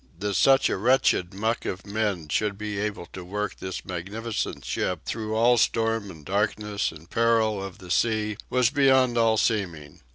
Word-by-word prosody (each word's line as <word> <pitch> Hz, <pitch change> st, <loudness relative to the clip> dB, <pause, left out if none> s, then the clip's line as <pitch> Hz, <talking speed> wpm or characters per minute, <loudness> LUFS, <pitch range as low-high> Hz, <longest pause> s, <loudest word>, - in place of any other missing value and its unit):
That 100 Hz, +2 st, -2 dB
such 135 Hz, +7 st, +5 dB
a -, -, -1 dB
wretched 115 Hz, -5 st, +2 dB
muck 110 Hz, +4 st, -1 dB
of 95 Hz, -, -5 dB
men 100 Hz, -6 st, -2 dB
should 100 Hz, +6 st, -1 dB
be 105 Hz, -1 st, -4 dB
able 105 Hz, -4 st, -3 dB
to 95 Hz, -, -7 dB
work 105 Hz, +2 st, -4 dB
this 95 Hz, -1 st, -6 dB
magnificent 100 Hz, +5 st, -4 dB
ship 90 Hz, -4 st, -2 dB
through 110 Hz, -1 st, -3 dB
all 120 Hz, +2 st, +4 dB
storm 115 Hz, -2 st, +1 dB
and 80 Hz, -5 st, -12 dB
darkness 105 Hz, +1 st, -1 dB
and 80 Hz, +1 st, -14 dB
peril 115 Hz, -1 st, +2 dB
of 95 Hz, -2 st, -7 dB
the 90 Hz, -2 st, -10 dB
sea 110 Hz, -2 st, +1 dB
was 125 Hz, -1 st, +3 dB
beyond 130 Hz, -3 st, +4 dB
all 115 Hz, -1 st, +3 dB
seeming. 90 Hz, -11 st, -1 dB
105 Hz, 170 wpm, -26 LUFS, 95-115 Hz, -, such